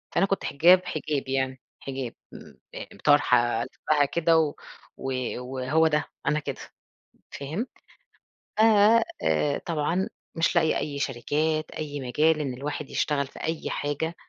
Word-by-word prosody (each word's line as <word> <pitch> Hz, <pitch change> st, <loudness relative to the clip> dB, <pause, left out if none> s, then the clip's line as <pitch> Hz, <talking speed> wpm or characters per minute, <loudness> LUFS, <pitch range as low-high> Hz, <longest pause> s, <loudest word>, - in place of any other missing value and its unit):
فأنا 195 Hz, -, +4 dB
كنت 195 Hz, 0 st, -1 dB
حِجاب، 180 Hz, +6 st, +5 dB
حجاب، 150 Hz, -4 st, -3 dB
يعني 130 Hz, -1 st, -1 dB, 0.2 s
حِجاب، 135 Hz, -3 st, -5 dB, 0.2 s
م -, -, -12 dB, 0.2 s
آآ، -, -, -6 dB, 0.2 s
طرحة 125 Hz, -5 st, +4 dB
ألِفَّها 145 Hz, -2 st, +1 dB
كده 165 Hz, +2 st, +2 dB
و 155 Hz, -2 st, +2 dB, 0.4 s
و 135 Hz, -, -4 dB, 0.3 s
وهو 130 Hz, +5 st, +1 dB
ده، 150 Hz, -1 st, +1 dB, 0.2 s
أنا 155 Hz, -, +2 dB
كده، 140 Hz, -2 st, -6 dB, 0.7 s
فهمت؟ 160 Hz, -, -4 dB, 0.9 s
ف -, -, +4 dB, 0.6 s
آآ، 80 Hz, -, +1 dB
طبعًا 170 Hz, +5 st, 0 dB, 0.3 s
مش 165 Hz, +1 st, +2 dB
لاقية 160 Hz, -2 st, +3 dB
أي 140 Hz, -2 st, -3 dB
شركات، 155 Hz, +4 st, -1 dB
أي 145 Hz, -2 st, -5 dB
مجال 150 Hz, +5 st, +2 dB
إن 135 Hz, -3 st, -2 dB
الواحد 145 Hz, +3 st, -5 dB
يشتغل 140 Hz, -2 st, 0 dB
في -, -, -13 dB
أي 160 Hz, 0 st, -2 dB
حاجة 145 Hz, +3 st, -2 dB
145 Hz, 140 wpm, -26 LUFS, 135-160 Hz, 0.9 s, حِجاب